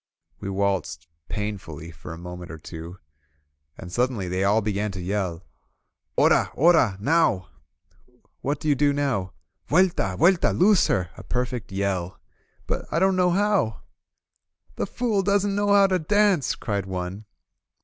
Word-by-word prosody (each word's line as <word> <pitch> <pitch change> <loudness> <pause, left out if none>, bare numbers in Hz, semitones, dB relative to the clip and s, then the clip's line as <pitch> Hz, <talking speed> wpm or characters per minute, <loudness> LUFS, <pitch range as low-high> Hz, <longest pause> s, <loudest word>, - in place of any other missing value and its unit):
We 100 - -5
waltzed 95 -4 -1 0.2
painfully 95 -7 -5
for 75 -1 -10
a 80 - -7
moment 90 0 -8
or 80 - -7
two, 85 +3 -9 0.8
and 90 - -9
suddenly 120 -4 0
they 90 +2 -1
all 100 +3 +3
began 105 -1 -1
to 95 - -6
yell: 90 -2 -2 0.7
''Ora! - - +4
Oral 155 - +4
Now!" 125 - +2 0.9
"What 140 +1 -1
do 155 - -5
you 150 - +5
do 145 +1 +2
now?" 130 -10 -1 0.4
Vueltal 160 - +2
Vuelta! 175 +2 +4
Loose 195 +1 +4
her!" 90 -2 0
a - - -9
perfect 125 -2 -3
yell. 95 -2 -2 0.5
"But - - -3
I - - 0
don't 190 +2 +3
know 180 -1 +3
how 195 - +1 0.5
!" - - -37
"The - - -1
fool 230 -5 0
doesn't 200 +1 +1
know 205 +1 0
how 200 -1 +6
to 185 -1 +1
dance," 200 -2 +2
cried 100 -4 -3
one. 95 +3 -5
105 Hz, 150 wpm, -24 LUFS, -, 0.9 s, how